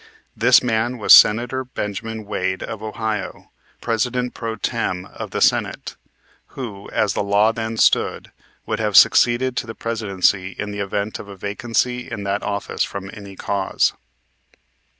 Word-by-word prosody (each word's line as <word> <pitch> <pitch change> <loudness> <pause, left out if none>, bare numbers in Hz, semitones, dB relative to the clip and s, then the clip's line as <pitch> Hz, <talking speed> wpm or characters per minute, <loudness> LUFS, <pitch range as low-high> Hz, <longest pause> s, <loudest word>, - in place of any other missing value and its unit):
This 125 +3 +5
man 120 +1 0
was 105 - +6
Senator 120 +4 +6
Benjamin 110 -2 -5
Wade, 95 -2 -2
of 110 - -6
Ohio, 110 -1 -4 0.3
President 125 +2 -1
pro 115 -1 -4
tem. 95 -4 -2
of - - -8
the - - -4
Senate, - - +1 0.6
who, 105 -7 -7
as 105 -3 0
the - - -1
law 100 +2 +3
then 115 0 -4
stood, - - +2 0.3
would - - -2
have - - +2
succeeded 125 +1 +5
to - - -2
the 115 - -7
Presidency 100 -4 0
in 105 -1 -4
the 105 - -6
event 100 +1 -3
of - - -9
a 100 -1 -10
vacancy 120 +5 -2
in 105 -3 -5
that 100 +1 -1
office 100 0 -4
from 95 0 -6
any 100 -2 -10
cause. 100 0 0
110 Hz, 150 wpm, -21 LUFS, 100-115 Hz, 0.6 s, was